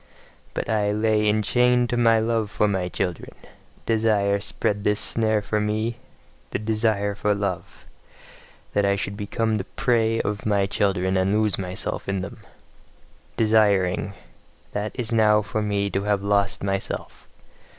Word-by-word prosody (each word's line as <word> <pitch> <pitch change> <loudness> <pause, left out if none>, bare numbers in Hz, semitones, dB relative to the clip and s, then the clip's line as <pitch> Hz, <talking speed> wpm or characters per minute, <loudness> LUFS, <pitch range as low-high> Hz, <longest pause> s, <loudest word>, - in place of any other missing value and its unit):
But - - -2
I 105 -2 +1
lay 105 0 +2
enchained 125 +3 +2
to - - +1
my 115 -1 +4
love 110 -1 0
for 105 - +1
my 95 -3 -1
children: 90 -2 -4 0.5
desire 105 -3 +2
spread 100 0 -1
this 105 0 +1
snare 110 -2 0
for 105 +1 -1
me 110 +2 -1 0.5
the - - -2
desire 110 -1 +1
for 105 +1 0
love 100 -3 -4 0.9
that 100 - +2
I 100 0 +2
should 100 0 -4
become 110 +2 -1
the 100 - -3
prey 115 +1 +1
of 105 0 -2
my 100 -2 +2
children, 95 -1 0
and 95 +1 +1
lose 105 -5 +1
myself 95 +1 -4
in 95 -1 -1
them. 95 - -7 1.0
Desiring 100 -4 +2 0.6
that 105 +1 -3
is 120 -1 -2
now 105 -2 +4
for 110 +1 -3
me 100 -1 0
to 95 - 0
have 100 -1 +1
lost 100 -1 +1
myself. 95 0 -4
105 Hz, 150 wpm, -24 LUFS, 100-110 Hz, 1.0 s, my